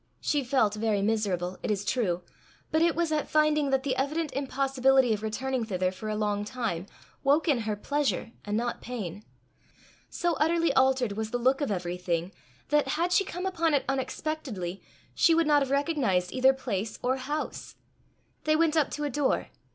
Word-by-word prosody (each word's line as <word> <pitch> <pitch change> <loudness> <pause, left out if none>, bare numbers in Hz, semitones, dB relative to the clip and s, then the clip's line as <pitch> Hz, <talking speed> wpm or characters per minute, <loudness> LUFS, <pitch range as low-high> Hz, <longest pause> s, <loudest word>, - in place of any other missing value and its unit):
She 290 -2 0
felt 245 -5 +2
very 210 -2 0
miserable, 195 -4 -1
it - - -3
is 205 -1 -1
true, 190 -7 0 0.5
but 315 - +2
it 335 0 +3
was 335 -1 0
at 305 -1 -1
finding 305 -2 +3
that 270 -1 +1
the 270 -2 0
evident 300 +4 -1
impossibility 270 -2 +2
of 210 - -3
returning 255 +3 -2
thither 185 -4 -1
for 215 +3 -6
a 215 - -1
long 205 -1 0
time, 210 -6 -3 0.4
woke 290 +4 +3
in 280 -6 +3
her 210 - 0
pleasure 280 +1 -1
and 205 +1 -1
not 240 +1 -2
pain. 210 -5 -6 0.9
So 345 -1 0
utterly 330 -1 +2
altered 260 -4 +3
was 215 +2 -3
the 245 - -1
look 260 +4 +2
of 285 - 0
everything, 180 -2 -2 0.4
that 295 -1 +3
had 330 +6 0
she 395 - +4
come 360 0 -5
upon 335 -5 +1
it 275 - 0
unexpectedly, 265 - -3 0.3
she 330 - +4
would 330 0 +3
not 295 -1 +4
have 275 - -1
recognized 270 - +1
either 260 +1 +5
place 225 -6 -3
or 255 +2 +1
house. 290 +4 -4 0.7
They 310 0 +3
went 320 0 +2
up 310 -3 +3
to 295 - -3
a 295 - 0
door. 280 +1 0
260 Hz, 180 wpm, -28 LUFS, 210-295 Hz, 0.9 s, either